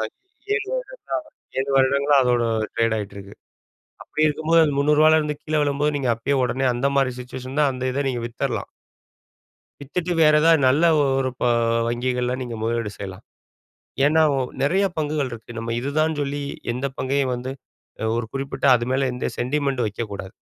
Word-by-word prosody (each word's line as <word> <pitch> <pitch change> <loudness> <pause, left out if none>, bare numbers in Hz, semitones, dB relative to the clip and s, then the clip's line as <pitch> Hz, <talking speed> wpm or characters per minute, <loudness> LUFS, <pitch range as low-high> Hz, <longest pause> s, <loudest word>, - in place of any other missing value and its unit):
வங்கி 395 +2 -7
7 400 +1 -3
வருடங்களா - - -6 0.4
7 135 +1 -1
வருடங்களா 140 +2 +3
அதோட 120 -1 +2 0.3
ட்ரேட் 115 -1 +2
ஆயிட்ருக்கு. 100 -1 -8 0.7
அப்டி 155 0 0
இருக்கும்போது 160 +2 +3
அந்த 145 - 0
ரூ.300ல 155 +2 +5
இருந்து 150 -1 -2
கீழே 155 -1 0
விழும்போது 145 +1 0
நீங்க 130 -3 0
அப்பயே 135 +5 -1
உடனே 130 +2 0
அந்த 120 +3 0
மாரி 135 -2 +2
சிச்சுவேஷன் 130 +2 -7
தான் 145 -2 +4
அந்த 130 0 -5
இத 140 - 0
நீங்க 120 -3 -2
வித்துரலாம். 120 - -3 1.1
வித்துட்டு 175 +5 -2
வேற 155 -1 +6
ஏதாவது 165 -1 +5
நல்ல 145 +6 +4 0.2
ஒரு 135 -1 +1
ப - - +1 0.4
வங்கிகள்ல 125 +1 -1
நீங்க 120 -2 -5
முதலீடு 115 -2 -1
செய்யலாம்! 95 +1 -8 0.8
ஏன்னா 160 +2 +4
ஓ - - +1 0.2
நிறைய 190 +8 +2
பங்குகள் 150 -3 -1
இருக்கு. 115 +1 -9
நம்ம 115 0 -3
இதுதான்ன்னு 150 +3 0
சொல்லி, 145 +1 -3 0.3
எந்த 130 +3 -2
பங்கையும் 135 -1 0
வந்து 125 +2 -5 0.5
அ - - -1
ஒரு 120 -1 -2
குறிப்பிட்ட 135 +1 -2
அது 120 -1 +1
மேல, 135 0 +1
எந்த 125 - -2
சென்டிமென்ட்டும் 130 -2 0
வெக்கக்கூடாது. 100 -2 -6
135 Hz, 160 wpm, -23 LUFS, 120-150 Hz, 1.1 s, வேற